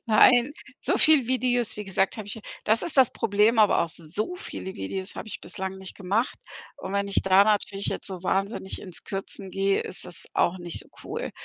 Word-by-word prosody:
Nein, 245 +4 +6 0.3
so - - 0
viele 300 -6 +6
Videos, 245 -3 +1
wie 210 - -5
gesagt, 190 +2 0
habe 215 -2 -6
ich 205 - -4
hier 220 - -10 0.2
Das 220 +2 +2
ist 320 - -2
das 260 -3 +6
Problem, 215 +2 +2
aber 210 -2 +5
auch 170 - -2
so 175 - -3
viele 190 - -6
Videos 185 - -5
habe 215 - -7
ich - - -7
bislang 190 -1 -5
nicht 190 -1 -7
gemacht. 205 +6 -1 0.4
Und 190 - -7
wenn 200 0 0
ich 200 - +1
da 190 +1 +6
natürlich 205 -1 0
jetzt - - -3
so 185 -3 -5
wahnsinnig 195 +1 -2
ins 185 -3 -6
Kürzen 195 0 -4
gehe, 195 +1 +1
ist - - -4
das - - -6
auch 180 +2 +2
nicht 175 -2 -2
so - - -13 0.2
cool. - - -4
200 Hz, 210 wpm, -26 LUFS, 190-225 Hz, 0.4 s, Nein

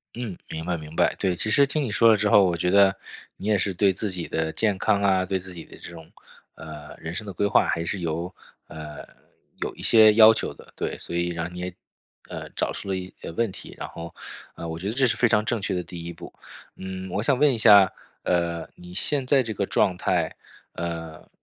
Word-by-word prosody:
嗯， 115 -7 -5
明 80 0 -5
白， 90 0 -1
明 75 +1 -10
白。 - - +3
对， 90 -2 0
其 110 - -2
实 140 +5 +5
听 145 +1 -1
你 115 - -3
说 115 +2 +4
了 110 - +6
之 105 0 +1
后， 100 - +7
我 85 -2 +1
觉 90 +1 0
得 100 0 +5 0.4
你 100 - -8
也 105 -1 +3
是 95 0 -1
对 95 +1 +3
自 100 +2 -3
己 90 -2 -4
的 80 0 -2
健 105 0 +1
康 100 0 +1
啊， 95 -2 +3
对 95 0 -1
自 95 +1 -11
己 85 -2 -9
的 - - -14
这 - - -10
种， 80 -2 -12 0.4
呃， 75 -1 -10
人 80 +1 -6
生 105 - -5
的 100 - -5
规 100 - 0
划 100 - +3
还 85 - -1
是 95 +2 -3
有， 85 +3 -3 0.3
呃， 75 -1 -9 0.5
有 - - -3
一 - - -10
些 110 -2 +6
要 110 0 +9
求 110 - -3
的。 - - -17
对， - - -3
所 - - -7
以 85 0 0
让 85 0 -4
你 - - -8
也 90 0 -5 0.6
呃， - - -6
找 - - 0
出 100 - -7
了 95 - 0
一 95 0 -7
呃， - - -6
问 115 +1 -1
题。 - - -11
然 - - -5
后 85 0 -9 0.4
呃， 85 - -7
我 80 0 -5
觉 95 +4 -4
得 110 - -2
这 135 -1 +3
是 115 - +2
非 115 +1 +3
常 105 -1 +2
正 115 0 -1
确 100 0 -2
的 90 - -1
第 85 0 -9
一 85 - -6
步。 - - -11 0.4
嗯， 95 0 -7
我 100 +4 -1
想 130 +1 +2
问 145 -1 +5
一 120 - -2
下， 100 -3 +7 0.3
呃， 85 -2 0
你 90 0 -12
现 135 +5 0
在 135 0 +4
这 115 -3 -4
个 100 -1 -2
状 95 -3 +2
态， 90 -3 -1 0.4
呃， 80 -2 -6
95 Hz, 265 characters per minute, -25 LUFS, 85-105 Hz, 0.6 s, 要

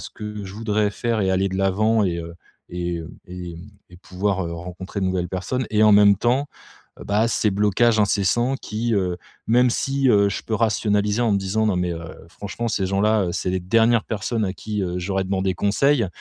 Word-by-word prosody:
ce - - -8
que 105 -2 -7
je 95 +1 -9
voudrais 105 -1 0
faire 115 0 -1
et 95 -1 +1
aller 95 +1 +1
de 95 - -4
l'avant 105 +3 +2
et, 85 -2 -1
heu 85 0 -7 0.4
et, 85 -1 -3
heu, 80 - -8 0.2
et 90 -2 -7 0.3
et 90 - -14
pouvoir, 95 0 -2
heu, 85 - -5
rencontrer 90 +4 -7
de 95 - 0
nouvelles 90 -1 -1
personnes. 105 +7 -3
Et 110 0 +3
en 105 -1 +6
même 100 -1 +6
temps, 125 +6 0 0.6
bah, 105 +3 +1
ces 110 -1 +1
blocages 105 +3 +2
incessants 105 +5 +1
qui, 115 -1 -2
heu 90 -3 0 0.3
même 125 +2 +4
si, 135 +1 0
heu, 100 -2 +4
je - - -4
peux 110 - -3
rationaliser 105 -1 +1
en 115 - +2
me 100 - +3
disant: 100 +3 0
«Non 100 -4 +1
mais, 90 -1 0
heu, 80 -1 -7
franchement 105 +6 -5
ces 100 -3 -1
gens-là, 100 +1 +2
heu, 85 - -2
c'est 90 +1 -2
les 95 0 -1
dernières 115 +5 +3
personnes 110 +1 -2
à 95 - -2
qui, 105 -1 -4
heu, 90 -1 -2
j'aurais 95 +1 -1
demandé 95 0 0
conseil». 110 +5 +2
100 Hz, 210 wpm, -22 LUFS, 95-110 Hz, 0.6 s, en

